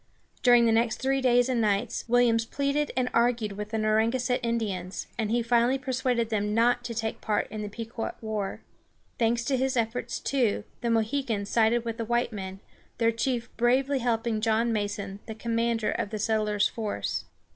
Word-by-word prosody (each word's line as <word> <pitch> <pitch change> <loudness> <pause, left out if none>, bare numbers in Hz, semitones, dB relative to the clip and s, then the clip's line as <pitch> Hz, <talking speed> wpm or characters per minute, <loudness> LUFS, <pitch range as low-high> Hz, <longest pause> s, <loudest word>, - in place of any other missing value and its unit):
During 245 -1 +6
the 230 - +4
next 225 0 +2
three 270 +1 +1
days 245 -1 +4
and 250 -3 +1
nights, 210 +2 0
Williams 230 -2 +3
pleaded 280 +3 0
and 255 -1 +2
argued 230 -2 +2
with 210 +1 -6
the 220 - -2
Narragansett 225 +4 +1
Indians, 210 -6 -2
and 220 -3 -1
he 235 +1 +1
finally 240 +2 +3
persuaded 255 -3 -1
them 210 -1 0
not 240 +1 +3
to 235 - -4
take 220 0 -3
part 210 -1 0
in 215 - -4
the 210 - -4
Pequot 225 +2 -5
war. 215 -3 -3 0.6
Thanks 235 0 +2
to 270 - +1
his 260 0 0
efforts, 230 +1 -1
too, 250 -7 0 0.2
the 235 - -1
Mohegans 225 -2 0
sided 230 +1 +3
with 230 -1 -3
the 230 - -3
white 240 +1 0
men, 190 -1 -6 0.4
their 230 -1 +3
chief 235 +1 -2
bravely 260 +3 +2
helping 230 -2 0
John 225 +1 +2
Mason, 205 -2 -3
the 220 - -6
commander 230 0 0
of 205 - -2
the 215 - -4
settlers' 210 -1 +1
force. 210 - -3
230 Hz, 180 wpm, -27 LUFS, 215-245 Hz, 0.6 s, During